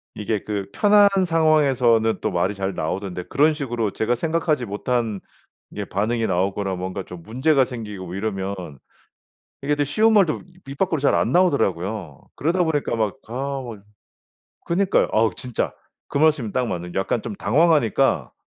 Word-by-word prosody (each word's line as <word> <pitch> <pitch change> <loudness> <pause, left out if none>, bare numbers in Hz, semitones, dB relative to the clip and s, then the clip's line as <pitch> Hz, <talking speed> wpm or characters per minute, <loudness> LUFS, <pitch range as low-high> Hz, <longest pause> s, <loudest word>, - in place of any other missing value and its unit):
이게 105 -1 -2
그 100 -2 -3
편한 205 -1 +5 0.2
상황에서는 135 -9 +3
또 - - -1
말이 90 +4 0
잘 95 0 -2
나오던데 90 +2 -3
그런 155 - +2
식으로 120 -7 -2
제가 115 +5 0
생각하지 155 -1 0
못한 110 0 -2 0.5
이게 - - -5
반응이 110 +3 -1
나오거나 95 +1 -1
뭔가 95 +1 -4
좀 90 -2 -11
문제가 130 - +2
생기고 105 -8 -7
이러면 100 -1 -3 1.1
이게 145 +1 0
또 145 - +1
쉬운 215 +11 +3
말도 195 -8 +3 0.2
입 135 - -8
밖으로 180 -4 +1
잘 140 - +3
안 - - +1
나오더라고요. 100 - 0
그러다 175 +4 +1
보니까 145 -7 -1
막 110 +3 -1
아 135 +3 -3
막 110 -5 -9 0.8
그니까요. 190 +3 +2
아우 110 0 +3
진짜. 125 -2 -3 0.3
그 - - -6
말씀이 150 -7 +2
딱 125 -1 0
맞는 90 -2 -5
약간 95 +4 0
좀 110 - -5
당황하니까 145 - +2
115 Hz, 335 characters per minute, -22 LUFS, 100-150 Hz, 1.1 s, 편한